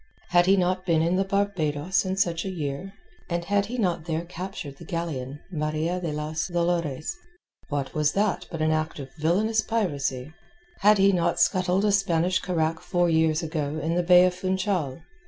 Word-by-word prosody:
Had 175 0 +4
he 195 +1 +5
not 185 0 +1
been 165 -3 +2
in 170 +2 +1
the 190 - +2
Barbados 190 -4 0
in 190 0 -2
such 170 -3 +1
a 195 - -3
year, 160 +1 -4 0.4
and 170 -1 -2
had 200 +1 +1
he 245 +3 -5
not 175 -7 0
there 165 0 -2
captured 175 -5 -7
the - - -11
galleon 145 -6 -4
Maria 155 +2 -1
de 170 -3 -2
las 155 +1 -3
Dolores? 170 - -1 0.5
What 140 -2 -3
was 150 -1 +1
that 195 -3 0
but 165 -2 -3
an 155 - +2
act 155 0 -1
of 135 -2 -8
villainous 210 +8 +2
piracy? 145 - -2 0.5
Had 210 +1 +5
he 195 0 +5
not 170 -2 +1
scuttled 185 +2 +2
a 210 - +3
Spanish 185 -2 +2
carack 165 -3 -1
four 175 -1 +1
years 160 0 +2
ago 155 -2 -2
in 160 +2 -1
the 175 - +2
bay 180 +1 +6
of 180 - +1
Funchal? 185 -5 -1
170 Hz, 185 wpm, -26 LUFS, 155-185 Hz, 0.5 s, bay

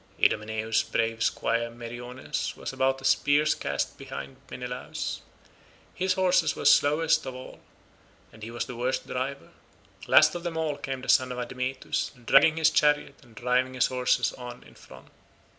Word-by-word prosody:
Idomeneus's 110 +1 +1
brave 115 0 -1
squire 115 0 0
Meriones 120 +2 -5
was - - -6
about 135 0 +1
a - - -8
spear's 145 +2 +3
cast 70 -1 -3
behind 135 -1 -8
Menelaus. 125 0 -5 0.7
His 185 0 0
horses 180 -4 +2
were - - -6
slowest 150 +3 +4
of 130 - -5
all, 130 - -10 0.7
and 110 - -15
he 110 - -6
was 120 +1 -3
the 125 - -8
worst 125 +2 -1
driver. 135 +2 -4 0.6
Last - - +6
of 175 - -5
them 170 -1 -4
all 155 -3 -1
came 135 -1 -5
the - - -8
son 130 -1 +4
of 125 - -5
Admetus, 125 +2 -3
dragging 155 +5 +5
his 160 -1 +4
chariot 150 -2 +2
and 120 -4 -20
driving 125 +2 0
his 130 - +3
horses 125 -1 +1
on 125 -1 -9
in 65 - -17
front. 65 +1 -15
130 Hz, 160 wpm, -27 LUFS, 120-145 Hz, 0.7 s, Last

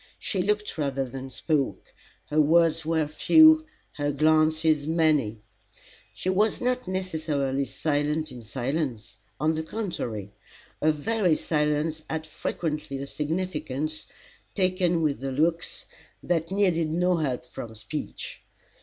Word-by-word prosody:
She 190 - -2
looked 210 -2 -1
rather 135 -2 0
than 135 +1 -7
spoke. 145 +1 -1 0.4
Her 155 +1 +5
words 165 +1 +4
were 160 -2 +2
few, 315 - +6 0.3
her 145 0 0
glances 155 0 +3
many. 150 -10 +2 0.7
She - - -6
was 200 +3 +2
not 250 0 -1
necessarily 155 -7 -1
silent 150 +1 -1
in 125 -2 -9
silence. 120 -2 -3 0.2
On 155 +3 +2
the 160 - -1
contrary, 140 - -4 0.5
her 155 - +4
very 180 +2 +1
silence 150 +1 0
had 160 0 -3
frequently 150 -2 -3
a 135 - -4
significance, 155 -1 -3 0.5
taken 185 -3 +2
with 140 -5 0
her 135 0 -2
looks, 165 +5 0 0.4
that 165 -2 0
needed 180 -5 +2
no 180 +2 +2
help 130 -6 -1
from 115 -2 -8
speech. 110 - -6
155 Hz, 125 wpm, -26 LUFS, 140-170 Hz, 0.7 s, few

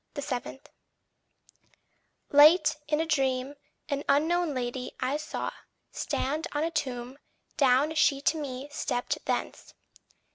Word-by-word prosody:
7. 265 -1 -4 1.7
Late, 300 +3 +7
in 300 0 +1
a 325 - +1
dream, 270 -3 0 0.3
an 285 -2 -2
unknown 315 +2 +2
lady 250 0 -4
I 265 +3 0
saw 305 0 -4 0.4
Stand 300 +4 -2
on 295 +1 0
a 330 - -1
tomb; 260 -3 -4 0.4
down 275 +3 +3
she 290 -3 +3
to 315 +2 +1
me 265 -1 -5
stepped 245 -4 -2
thence. - - -3
285 Hz, 115 wpm, -28 LUFS, 260-305 Hz, 1.7 s, Late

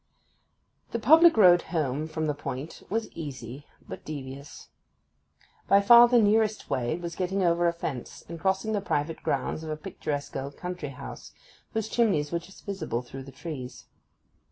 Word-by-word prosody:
The - - +1
public 320 +6 +7
road 180 -4 +7
home 155 -2 -2
from 160 0 -3
this 150 -1 -1
point 140 +2 -6
was 225 +2 -2
easy 140 -3 -8 0.2
but - - -8
devious. 140 -1 -8 1.0
By 200 - +6
far 235 +4 +8
the 245 0 +4
nearest 215 0 +2
way 130 +5 0
was 170 -1 -6
by - - -13
getting 190 +1 0
over 170 0 +3
a - - +3
fence, 150 -7 -6
and 170 0 -7
crossing 190 +4 0
the 205 - 0
private 160 -3 -2
grounds - - -1
of 160 - -7
a 155 - -3
picturesque 145 -1 -5
old 140 +1 -5
country 180 -5 -5
house, 135 - -9 0.4
whose 220 -1 -1
chimneys 200 -12 +1
were 170 - 0
just 190 +3 -16
visible 190 - -3
through 135 +2 -9
the 135 - -10
trees. 135 -3 -8
170 Hz, 170 wpm, -27 LUFS, 145-200 Hz, 1.0 s, far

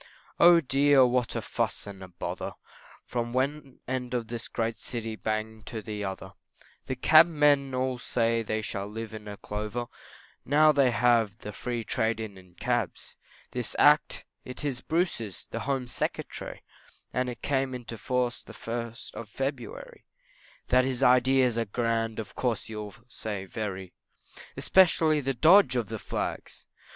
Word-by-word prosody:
Oh 170 0 +8
dear, 135 -1 +5
what 125 -1 0
a - - -2
fuss - - -2
and 100 -1 -9
a 95 - -8
bother, 90 - -5 0.5
From 120 -1 -3
one 135 +1 -2
end 125 -1 -2
of 115 -2 -2
this 120 0 -5
great 115 -1 -2
city 115 -2 -5
bang 110 0 -3
to 115 - -4
the 105 -1 -4
other, 95 -2 -5 0.5
The - - -2
Cabmen 145 -5 +5
all 130 -1 -1
say 115 -1 +1
they 110 0 -2
shall 100 -1 -4
live 110 +1 -6
in 105 -1 -7
clover 105 +3 -3 0.6
Now 155 +3 +5
they 140 -3 +4
have 115 -3 +3
the 105 - -7
Free 120 +2 -3
trade 110 +1 0
in 95 -5 -9
cabs; 120 -3 -2 0.4
This - - -4
Act, - - +4 0.2
it 125 +4 -7
is 130 -3 -2
Bruce's, 160 - -2
the - - -3
Home 130 -2 0
Secretary, 120 - -4 0.5
And 125 0 0
it 120 - -8
came 135 -2 0
into 120 -2 -7
force 125 +2 -1
the - - -13
1st 115 0 -6
of 115 - -8
February, 135 +1 -5 0.6
That 130 +1 +5
his 130 -1 -1
ideas 125 -1 +4
are 115 - 0
grand, 115 0 -1
of 110 - -6
course 120 -4 -2
you'll 105 -2 -6
say 105 -5 -5
very, 95 -3 -5 0.6
Especially 160 -4 +4
the 135 0 -1
dodge 160 - +6
of 115 -5 -1
the - - -4
Flags! - - -5
120 Hz, 155 wpm, -28 LUFS, 110-130 Hz, 0.6 s, Oh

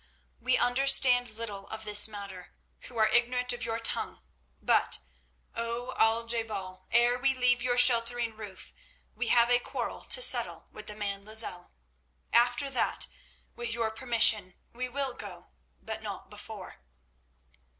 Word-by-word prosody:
"We 255 +2 +1
understand 250 -1 +4
little 215 -3 -7
of 220 0 -8
this 210 -1 +5
matter, 200 -4 -10 0.3
who 245 - -10
are 220 -1 +4
ignorant 250 +2 +1
of 240 0 -5
your 225 -1 -2
tongue, 230 - -2 0.4
but, - - +2 0.6
O 235 +2 -4
Al 225 +1 +2
je 230 0 -1
bal, 190 -4 -8
ere 240 +1 +3
we 270 +1 +1
leave 250 -1 +2
your 245 0 -1
sheltering 240 -2 +3
roof 210 -3 -10 0.4
we 245 - -4
have 235 +1 +4
a 245 - +4
quarrel - - -5
to - - +4
settle - - +3
with 215 - -12
the 210 - -8
man 200 -1 -5
Lozelle. 215 -4 -2 0.6
After 245 +3 +3
that, 255 - +1 0.5
with 240 -1 -3
your 230 -2 -2
permission, 220 -5 +2 0.2
we 250 +1 -5
will 270 0 -3
go, - - -9 0.3
but 220 0 -6
not 200 -2 -8
before." 210 -1 -10
230 Hz, 150 wpm, -28 LUFS, 215-245 Hz, 0.6 s, this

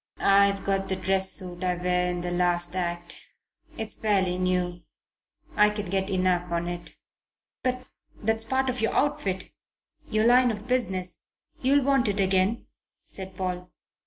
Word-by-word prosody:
"I've 200 0 +4
got 195 0 -1
the 190 - +2
dress 190 +1 +3
suit 180 -1 -1
I 180 -1 +1
wear 180 0 +1
in 175 0 -3
the 175 0 -3
last 175 0 +1
act. 175 -1 -3 0.6
It's 220 -1 -2
fairly 190 -4 +1
new. 180 -1 -1 0.7
I 210 0 +5
can 210 -3 -4
get 195 0 0
enough 180 -2 +1
on 170 0 -1
it." 175 0 -6 0.7
"But 255 0 -2 0.3
that's 225 +1 +1
part 265 +3 0
of 255 -2 -2
your 225 - 0
outfit 275 -11 -1 0.6
your 215 +1 +1
line 245 +1 +5
of 210 -2 -5
business; 190 -8 -1 0.4
you'll 275 +1 +3
want 275 -3 +3
it 205 0 0
again," 190 +4 +1 0.4
said 190 -1 -8
Paul. 180 -1 -3
190 Hz, 155 wpm, -26 LUFS, 180-220 Hz, 0.7 s, I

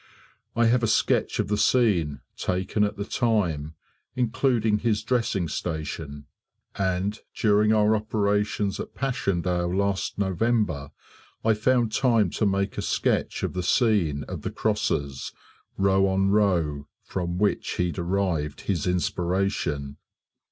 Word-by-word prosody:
I 120 0 +3
have 120 +2 +3
a 115 - +1
sketch 110 - +1
of - - 0
the 105 0 0
scene, 95 - +2
taken 95 +3 -1
at 105 0 -1
the 100 - -3
time, 85 - 0 0.4
including 115 -3 +1
his 110 -2 0
dressing 115 -8 0
station; 75 -2 -5 0.5
and 95 +2 -1 0.2
during 105 0 +3
our 110 0 +4
operations 105 -2 0
at - - -7
Passchendaele 90 -9 -1
last 100 -1 -1
November, 95 - 0 0.6
I 110 - +5
found 120 +1 +2
time 115 -6 +2
to 105 - 0
make 100 0 -1
a - - 0
sketch - - 0
of - - -1
the 90 - -2
scene 90 - +2
of - - -7
the - - -3
crosses, 70 -2 -2 0.4
row 95 0 +3
on 95 +1 +2
row, 85 -9 +1 0.2
from 90 -2 -3
which 105 +2 0
he 90 -1 0
derived 85 -5 -1
his 90 -4 -1
inspiration." 90 -5 -1
100 Hz, 130 wpm, -25 LUFS, 85-110 Hz, 0.6 s, I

